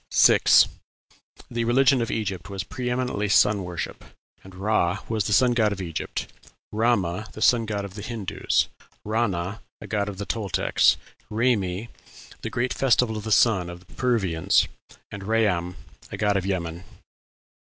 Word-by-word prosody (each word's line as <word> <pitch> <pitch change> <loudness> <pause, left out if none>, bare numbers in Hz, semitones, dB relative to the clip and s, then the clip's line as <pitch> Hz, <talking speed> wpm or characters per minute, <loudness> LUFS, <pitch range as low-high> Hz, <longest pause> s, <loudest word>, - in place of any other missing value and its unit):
6. - - +6 0.8
The 120 -1 -1
religion 130 +2 +4
of 115 - -2
Egypt 100 -4 -3
was 95 -1 -4
pre 125 +4 -4
eminently 125 -4 -1
sun 105 0 +4
worship, 85 -2 -5 0.4
and 95 -1 -13
Ra 95 -2 +1
was 110 -3 -1
the - - -2
sun 125 +3 +4
god 110 -3 +2
of 100 - -4
Egypt, 85 -4 -4 0.5
Rama, 105 -3 0
the 110 - -9
sun 115 -2 +4
of 100 -2 -3
the 105 - -8
Hindoos, 110 -3 -1 0.4
Rana, 105 -3 -1 0.2
a - - -9
god 105 -1 -1
of 100 - -7
the 100 - -4
Toltecs, 105 -4 +2 0.3
Raymi, 110 -3 0 0.5
the - - -4
great 125 +2 -1
festival 125 -3 +2
of 105 0 -6
the 110 - -3
sun 100 -6 +4
of 90 +1 -10
the - - -19
Peruvians, 100 -10 +1 0.4
and 100 - -7
Rayam, 95 -5 0 0.4
a - - -5
god 105 -1 +1
of 95 -1 -1
Yemen. 85 -2 -3
105 Hz, 155 wpm, -25 LUFS, 95-115 Hz, 0.8 s, 6